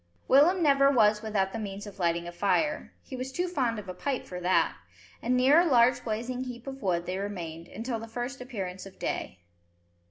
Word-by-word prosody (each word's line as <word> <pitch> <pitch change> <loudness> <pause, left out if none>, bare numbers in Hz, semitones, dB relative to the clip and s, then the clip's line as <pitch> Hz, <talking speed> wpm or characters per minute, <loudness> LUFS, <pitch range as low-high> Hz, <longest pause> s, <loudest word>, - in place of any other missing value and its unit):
Willem 335 +7 +5
never 275 -2 +5
was 215 -5 +4
without 205 -3 -1
the 225 - -3
means 200 -1 -5
of 205 -1 -11
lighting 170 -1 0
a - - -5
fire, 255 - 0
he 265 - -8
was 255 +1 -5
too 355 +6 -1
fond 255 -10 0
of 205 -2 -7
a 185 - -5
pipe 260 +8 -3
for 180 - -6
that, 180 +1 +2 0.5
and 250 +2 +1
near 270 +5 +6
a 350 - +4
large 245 -4 +4
blazing 245 +3 -3
heap 245 -1 -8
of 270 0 -7
wood 175 -4 0
they 185 +1 -3
remained 170 -5 -5
until 230 +3 -4
the 225 - -8
first 245 +3 -5
appearance 195 -7 -6
of 190 -1 -15
day. 90 - -4
230 Hz, 210 wpm, -28 LUFS, 190-260 Hz, 0.5 s, near